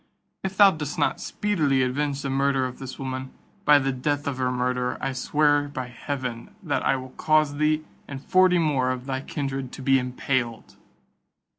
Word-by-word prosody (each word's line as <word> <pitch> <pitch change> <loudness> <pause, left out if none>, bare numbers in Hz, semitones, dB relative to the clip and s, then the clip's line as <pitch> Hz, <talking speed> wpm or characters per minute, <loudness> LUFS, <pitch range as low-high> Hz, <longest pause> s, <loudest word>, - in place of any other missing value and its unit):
If 190 0 -4
thou 200 -2 +8
dost 150 -3 -5
not - - 0
speedily 150 -11 +1
avenge 140 +2 -1
the 140 - -2
murder 135 -1 +2
of 125 -1 -6
this 130 -1 -7
woman, 130 -1 -4 0.4
by 150 0 +7
the 135 -1 +1
death 145 +3 -1
of 140 -2 -3
her 125 0 +1
murderer, 125 0 -1
I 135 - -2
swear 145 +2 +2
by 130 -3 -5
heaven, 125 - -5
that 155 -5 0
I - - +3
will 130 -1 -7
cause 155 -2 +3
thee 155 +1 +2 0.2
and 135 -1 -6
forty 185 -1 +5
more 145 -6 +1
of 130 0 -3
thy 130 -1 -2
kindred 135 -3 -4
to 135 - -8
be 135 0 +4
impaled." 125 -2 -2
135 Hz, 180 wpm, -25 LUFS, 130-150 Hz, 0.4 s, thou